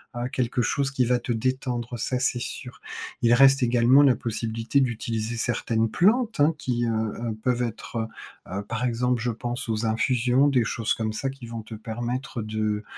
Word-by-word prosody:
heu, 120 +1 -2
quelque 125 0 0
chose 135 +3 0
qui 130 -2 +1
va 125 +1 +3
te 120 +1 -4
détendre, 125 0 -2
ça 125 - -1
c'est 125 -1 0
sûr. 125 0 -7 0.4
Il 120 0 +5
reste 135 +1 +6
également 120 +3 +5
la 135 -3 +5
possibilité 115 +3 -1
d'utiliser 115 -2 -2
certaines 115 -1 0
plantes 220 - +2
hein, 150 +3 +5
qui, 120 -4 -1
heu - - 0
heu, 110 +1 -2
peuvent 125 -1 +1
être, 115 0 -6
heu 110 - 0 0.5
heu, - - -5
par 115 +1 -3
exemple 125 0 0
je 120 0 0
pense 120 +1 -4
aux 110 0 0
infusions. 125 +4 +2
Des 125 -4 +2
choses 115 0 0
comme 110 -1 -2
ça 135 +5 -2
qui 135 -3 -9
vont 115 -1 -5
te 110 - -10
permettre 120 +3 -4
de 110 -1 -2
120 Hz, 190 wpm, -25 LUFS, 115-125 Hz, 0.5 s, reste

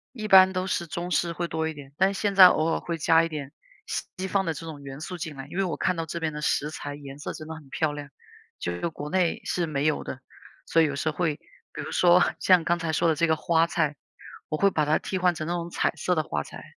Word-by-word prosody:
一 215 -3 -5
般 190 -1 +8
都 185 0 -1
是 175 -2 -2
中 175 +4 -5
式 170 -1 +1
会 170 +1 -3
多 160 0 -1
一 160 - -3
点， 140 -2 -12
但 190 +1 +3
现 200 0 -1
在 190 -2 +11
偶 160 -1 +2
尔 - - 0
会 170 -1 -4
加 165 +1 +4
一 - - -2
点 150 -4 -6 0.3
西 190 +1 -5
方 195 -1 +1
的 165 - -1
这 160 +2 -8
种 155 -3 -8
元 135 +1 -9
素 180 +3 -6
进 160 -4 -6
来， 135 0 -7
因 175 - -6
为 195 - +2
我 175 - -2
看 180 -1 0
到 165 - -2
这 170 +1 -5
边 160 -1 -1
的 150 - -6
食 150 0 0
材 145 -2 -6
颜 140 -1 -10
色 - - -5
真 155 0 -9
的 - - -4
很 155 -3 -11
漂 155 +2 0
亮， 145 -1 -7 0.5
就 90 - -3
是 90 - -2
国 150 -2 -6
内 180 -1 +1
是 175 - -1
没 145 -2 -2
有 155 - 0
的， 130 - -6 0.4
所 165 - +3
以 - - +5
有 140 -2 -2
时 155 +2 -1
候 - - -17
会 165 -5 +1 0.4
比 - - -5
如 - - -6
说 180 0 +5 0.2
像 180 -3 +5
刚 175 +2 +1
才 165 -1 -2
说 165 - +2
的 160 - +2
这 170 +2 +2
个 160 - +3
花 165 +1 +2
菜， 155 -4 0 0.5
我 155 - -2
会 200 +3 +4
把 150 -3 +1
它 155 +1 +3
替 190 - -3
换 180 -2 +2
成 155 - -4
那 175 - -1
种 170 -1 -3
彩 - - +1
色 180 +4 0
的 155 - +1
花 75 - -3
菜， - - -11
165 Hz, 305 characters per minute, -26 LUFS, 150-175 Hz, 0.5 s, 在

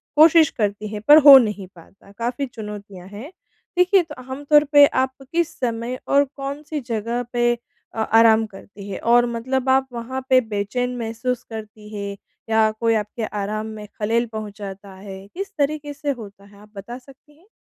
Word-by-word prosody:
कोशिश 315 +1 +6
करती 210 -1 -2
हैं 210 - -5
पर 295 +1 +9
हो 280 -2 +12
नहीं 210 -6 0
पाता। 185 +4 -18
काफ़ी 245 +4 -2
चुनौतियाँ 205 -5 -9
हैं। 210 - -10 0.5
देखिए 360 +1 +4
तो 310 -3 -11 0.2
आम 270 +2 -6
तौर 295 0 +5
पे, 290 -1 +6
आप 260 -2 0 0.2
किस 335 -1 -1
समय 240 0 -3
और 280 +1 +4
कौन 280 +1 -6
सी 305 0 -4
जगह 230 +2 -2
पे 240 0 +2 0.4
अ, - - -6
आराम 225 0 +4
करती 200 0 -12
हैं? 195 - -5
और 240 +1 +4
मतलब 255 +3 -2
आप 265 0 +3
वहाँ 255 +3 -5
पे 260 -1 +6
बेचैन 230 +3 -3
महसूस 235 +2 -3
करती 215 -1 -9
हैं 200 -1 -5 0.3
या 220 -1 +3
कोई 230 -1 +2
आपके 215 +2 -3
आराम 210 +1 -4
में 210 0 -9
खलल 230 +3 +1
पहुँचाता 200 -2 -8
है? 195 0 -10
किस 390 - -7
तरीके 290 0 -1
से 290 0 -3
होता 200 -2 -12
है, 200 0 -19
आप 210 0 -18
बता 205 +5 -8
सकती 275 +3 -19
हैं? 350 +5 -26
230 Hz, 180 wpm, -21 LUFS, 210-275 Hz, 0.5 s, हो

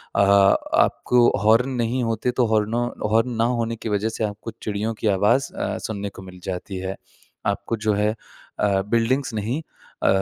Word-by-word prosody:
अ, - - +2
आपको 100 +4 +4 0.2
हॉर्न 115 +5 +4
नहीं 125 0 -1
होते, 115 +1 0
तो 125 -1 +2
हॉर्नों 110 +2 +1 0.2
हॉर्न 115 +3 +3
ना 115 - +1 0.2
होने 115 0 -1
की 115 0 -6
वजह 105 +2 0
से 110 - -4
आपको 105 +2 -6
चिड़ियों 105 +2 -2
की 110 - +1
आवाज़ 105 +7 +2
अ, - - -2
सुनने 100 -3 -4
को 95 - -12
मिल 90 -1 -12
जाती 95 +1 -4
है। 95 +1 -4 0.5
आपको 115 - -1
जो 105 - +4
है 105 +1 +2 0.5
अ, 100 -2 +2
बिल्डिंग्स 115 +3 +1
नहीं 115 +9 -2 0.4
अ, - - +3
110 Hz, 175 wpm, -23 LUFS, 100-115 Hz, 0.5 s, आपको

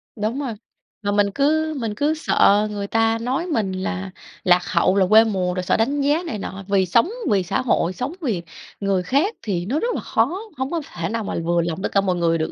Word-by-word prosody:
Đúng 220 +5 -2
rồi. 265 -5 -3 0.5
Mà 205 -1 -1
mình 205 0 +2
cứ 315 +2 +2
mình 225 -3 -2
cứ 290 +6 +1
sợ 210 -9 +3
người 200 -1 -4
ta 225 +1 +2
nói 265 +9 -1
mình 220 - 0
là 190 0 -4 0.3
lạc 180 0 +4
hậu, 185 - +2
là 195 -1 +4
quê 220 +1 +8
mùa, 190 -5 -1
rồi 185 0 -3
sợ - - +1
đánh 275 +6 +1
giá 295 +5 +2
này 225 - -4
nọ. 195 0 -6
Vì 195 -2 +2
sống 230 - +3 0.2
vì 195 -2 +3
xã 195 +2 -1
hội, 185 -7 +1
sống 235 - -4
vì 225 - -1 0.4
người 195 -2 0
khác 290 - +1
thì 180 -5 -2
nó 265 +10 0
rất 480 +5 -1
là - - -3
khó, 250 +11 0 0.2
hông 260 +1 -2
có 340 -2 -1
thể 170 -1 -3
nào 230 0 -2
mà - - -4
vừa 170 +1 +2
lòng 170 +2 -3
tất - - -1
cả 200 - +3
mọi 185 -2 0
người 170 -1 +1
được, 160 - -2
210 Hz, 240 wpm, -22 LUFS, 185-265 Hz, 0.5 s, quê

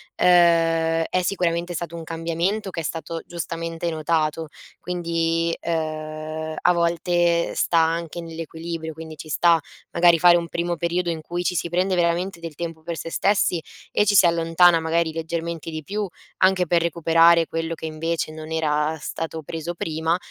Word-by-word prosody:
ehm, 165 -2 +4
è 185 - +1
sicuramente 175 -2 -1
stato 170 0 -5
un 165 - -6
cambiamento 170 +6 -2
che 170 - -4
è - - -7
stato 165 +1 -4
giustamente 165 0 -4
notato. 160 0 -1 0.3
Quindi, 165 -1 -1
ehm, 155 -1 -4
a - - +4
volte 170 0 +1
sta 170 - +1
anche 165 +1 0
nell'equilibrio, 165 0 -6
quindi 160 0 -9
ci 155 - -10
sta 170 +2 +4 0.3
magari 170 -1 +5
fare 175 +1 +7
un 170 -1 -4
primo 170 +1 -1
periodo 175 +1 -1
in 165 -2 -3
cui 175 +2 -4
ci 180 - 0
si 170 +1 -1
prende 185 +2 +1
veramente 175 +1 0
del 165 -2 -7
tempo 165 0 -5
per 170 0 -4
se 165 - -5
stessi 190 -2 +1 0.3
e 210 - +3
ci 205 - +3
si 190 - +7
allontana 170 0 +4
magari 160 0 0
leggermente 165 0 -4
di 155 0 -5
più, 205 +6 -3 0.3
anche 185 -1 +3
per 170 +1 +3
recuperare 165 0 +4
quello 165 0 -3
che 160 - -8
invece 160 0 -2
non 155 0 -9
era 155 -1 0
stato 160 +2 -5
preso 165 +3 -5
prima; 160 0 -1
165 Hz, 165 wpm, -23 LUFS, 160-175 Hz, 0.3 s, fare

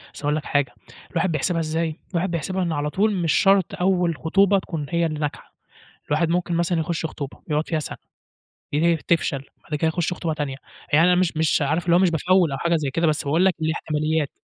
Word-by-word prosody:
أصل - - -10
هاقول 145 +1 +1
لك 155 - -4
حاجة 145 -3 0 0.4
الواحد 185 - 0
بيحسبها 165 +3 0
إزاي؟ 160 0 -2
الواحد 175 +1 -1
بيحسبها 185 +3 -2
إن 170 - -1
على 150 -1 -1
طُول 205 +4 +1
مش 170 -3 +1
شرط 195 -2 +3
أول 180 -4 +1
خطوبة 195 +6 +3
تكُون 160 -5 -5
هي 170 0 +1
اللي 155 -2 -3
ناجحة، 150 -1 -5 0.5
الواحد 160 +3 +1
ممكن 175 0 0
مثلًا 170 0 +1
يخش 160 0 -2
خطوبة 140 -3 -6
يقعد 150 +1 0
فيها 160 -2 0
سَنة - - -6 0.8
ي 165 +3 +3
تفشَل 145 -4 -1 0.2
بعد 150 - -4
كده 160 +2 +1
يخش 175 +2 0
خطوبة 165 -2 -2
تانية، 145 -3 -3 0.4
يعني 165 +4 +6
أنا 180 - +5
مش 180 -3 +1
مش 160 -1 +2
عارف 160 +5 0
إن 170 - +4
هو 175 - +6
مش 185 -2 +4
بافوّل 175 0 +3
أو 135 - -2
حاجة 170 +2 +1
زي 145 -4 -1
كده 165 +2 +1
بس 150 - +1
باقول 160 +6 +2
لك 190 - +3
الاحتماليات. 155 -1 0
165 Hz, 215 wpm, -23 LUFS, 150-175 Hz, 0.8 s, يعني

